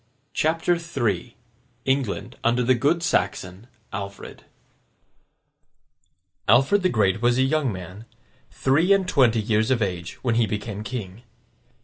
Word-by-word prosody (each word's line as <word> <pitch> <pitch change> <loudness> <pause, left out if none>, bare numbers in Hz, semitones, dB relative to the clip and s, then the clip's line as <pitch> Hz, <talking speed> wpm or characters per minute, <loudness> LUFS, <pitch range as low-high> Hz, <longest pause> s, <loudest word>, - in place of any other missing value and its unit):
CHAPTER 165 +3 +1
III 120 - -2 0.5
ENGLAND 125 -4 -1
UNDER 120 +1 +2
THE 130 +2 +4
GOOD 150 +8 +1
SAXON, 95 - -1 0.3
ALFRED 100 -1 -7 2.0
Alfred 135 - +5
the 185 - +2
Great 105 - +1
was 120 0 +3
a 130 - +4
young 140 -1 +1
man, 95 +3 -9 0.4
three 160 +9 +2
and 195 -2 +1
twenty 125 -9 +3
years 110 +1 +1
of 130 -2 +2
age, 90 -3 -4
when 120 -3 +1
he 110 - +2
became 105 0 -4
king. 105 -3 -6
120 Hz, 125 wpm, -24 LUFS, 105-140 Hz, 2.0 s, Alfred